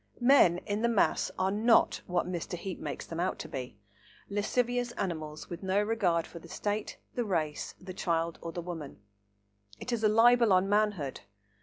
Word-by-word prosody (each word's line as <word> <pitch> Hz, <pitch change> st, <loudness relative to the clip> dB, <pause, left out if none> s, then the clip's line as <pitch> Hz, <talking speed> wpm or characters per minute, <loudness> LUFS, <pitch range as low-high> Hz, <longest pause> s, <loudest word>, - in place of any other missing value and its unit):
Men 240 Hz, -9 st, +6 dB
in 205 Hz, +1 st, -2 dB
the 235 Hz, -, +2 dB
mass 225 Hz, -4 st, +2 dB
are 190 Hz, +1 st, +1 dB
not 225 Hz, +3 st, +3 dB
what 175 Hz, -1 st, 0 dB
Mr. 175 Hz, -1 st, -4 dB
Heape 185 Hz, +1 st, -6 dB
makes -, -, -5 dB
them 165 Hz, -, -6 dB
out 185 Hz, +2 st, 0 dB
to -, -, -6 dB
be,—lascivious 200 Hz, -, -3 dB
animals 155 Hz, -7 st, -4 dB
with 175 Hz, -, -7 dB
no 190 Hz, +1 st, +1 dB
regard 190 Hz, -7 st, +1 dB
for 170 Hz, -, -10 dB
the 170 Hz, -, -14 dB
State, 205 Hz, +4 st, -3 dB, 0.2 s
the 245 Hz, -, -1 dB
race, 160 Hz, -8 st, -2 dB
the 185 Hz, 0 st, -8 dB
child 170 Hz, -2 st, -1 dB
or 165 Hz, -, -5 dB
the 175 Hz, +1 st, -5 dB
woman; 165 Hz, -, -7 dB, 0.8 s
it 250 Hz, -, -4 dB
is 225 Hz, -2 st, -1 dB
a 215 Hz, -, +5 dB
libel 230 Hz, 0 st, +5 dB
on 185 Hz, +1 st, +4 dB
manhood. 205 Hz, -9 st, 0 dB
185 Hz, 175 wpm, -30 LUFS, 165-215 Hz, 0.8 s, Men